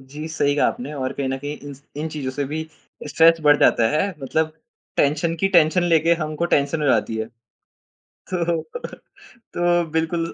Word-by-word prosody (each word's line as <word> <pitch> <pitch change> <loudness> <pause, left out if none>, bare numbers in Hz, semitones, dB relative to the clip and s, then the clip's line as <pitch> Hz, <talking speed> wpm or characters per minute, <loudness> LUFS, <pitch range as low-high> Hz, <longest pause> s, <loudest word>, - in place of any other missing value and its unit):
जी, 150 +3 -7
सही 145 -2 +1
कहा - - +3
आपने 245 -8 -4
और 130 -1 -3
कहीं 135 -1 -3
न 135 - -1
कहीं 145 +2 -5
इन 145 0 -9
स 140 - -20
इन 155 +2 -3
चीज़ों 145 -4 -4
से 140 +2 -3
भी 155 +3 -3 0.5
स्ट्रेस 165 +2 +5
बढ़ 145 -1 +6
जाता 115 -1 +4
है 155 +7 +1
मतलब 155 +3 -1 0.4
टेंशन 155 +4 +1
की 195 - +3
टेंशन 175 -1 +4
लेके 165 -1 +3
हमको 155 +2 -2
टेंशन 145 +3 0
हो - - +1
जाती 110 -3 +1
है। 110 0 -2 1.1
तो 170 -2 0 0.9
तो 175 0 +2
बिल्कुल 165 +1 -1
155 Hz, 180 wpm, -22 LUFS, 145-165 Hz, 1.1 s, बढ़